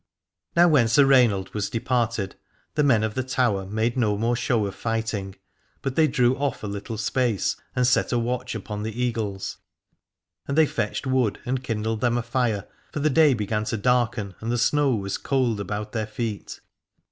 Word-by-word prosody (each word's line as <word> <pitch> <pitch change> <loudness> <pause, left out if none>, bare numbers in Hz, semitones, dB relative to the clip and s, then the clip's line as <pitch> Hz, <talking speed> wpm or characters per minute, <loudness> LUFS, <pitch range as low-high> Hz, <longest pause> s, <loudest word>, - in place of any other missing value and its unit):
Now 175 +1 +6
when 145 -8 +4
Sir 130 +5 +5
Rainald 120 -8 +3
was 105 -2 -2
departed 115 -4 -1 0.4
the 150 - +1
men 120 -7 +4
of 110 -1 -1
the 130 - -1
Tower 125 -7 0
made 110 +4 0
no 110 -5 +1
more 115 +3 +1
show 120 -2 +1
of 100 - -4
fighting, 110 -4 -3 0.5
but 135 -1 -2
they 160 -1 +5
drew 125 -2 +3
oif 145 -4 -2
a - - -3
little 100 +2 -5
space 115 -2 0 0.2
and 125 - +2
set 125 - +2
a 120 - +2
watch 125 +1 -2
upon 105 -1 -5
the 110 +2 -5
Eagles: 110 -6 -2 0.9
and 140 - -2
they 160 - +7
fetched - - -2
wood 130 -6 +1
and 130 +1 -2
kindled 110 -2 -2
them 120 -1 +2
a 120 - -1
fire, 120 -4 0 0.3
for - - -4
the 150 +1 +2
day 150 -2 +5
began 105 0 -2
to 115 - -2
darken 120 -3 +1
and 115 +2 -3
the 120 - +1
snow 140 +1 +2
was 100 -2 -3
cold 125 -6 0
about 105 +1 -4
their 110 -2 -2
feet. 110 -2 -5
115 Hz, 190 wpm, -24 LUFS, 105-125 Hz, 0.9 s, they